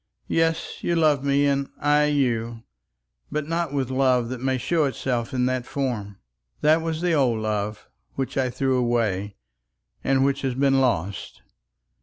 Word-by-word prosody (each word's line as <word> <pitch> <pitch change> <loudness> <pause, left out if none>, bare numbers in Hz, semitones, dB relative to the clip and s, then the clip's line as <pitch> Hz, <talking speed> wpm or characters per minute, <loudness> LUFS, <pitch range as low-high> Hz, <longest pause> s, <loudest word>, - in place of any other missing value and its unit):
"Yes; 165 0 0
you 170 - +1
love 155 -4 +3
me, 140 0 +2
and 140 -1 0
I 150 0 +3
you; 120 -6 0 0.7
but 150 -1 -2
not 165 -2 -1
with 135 -3 -1
love 130 -3 +2
that 125 -1 -5
may 130 0 0
show 160 +4 +1
itself 125 -3 -2
in 125 -1 0
that 130 -1 -1
form. 115 -8 -3 0.4
That 155 +2 +4
was 160 0 -3
the 175 -1 +1
old 130 -7 +2
love, 105 -1 -3 0.3
which 135 -1 -3
I 130 -2 +1
threw 130 +1 0
away, 110 -5 0 0.7
and 135 0 +2
which 140 0 0
has 130 -2 -1
been 135 0 +3
lost. 100 -6 -2
135 Hz, 160 wpm, -24 LUFS, 120-145 Hz, 0.7 s, That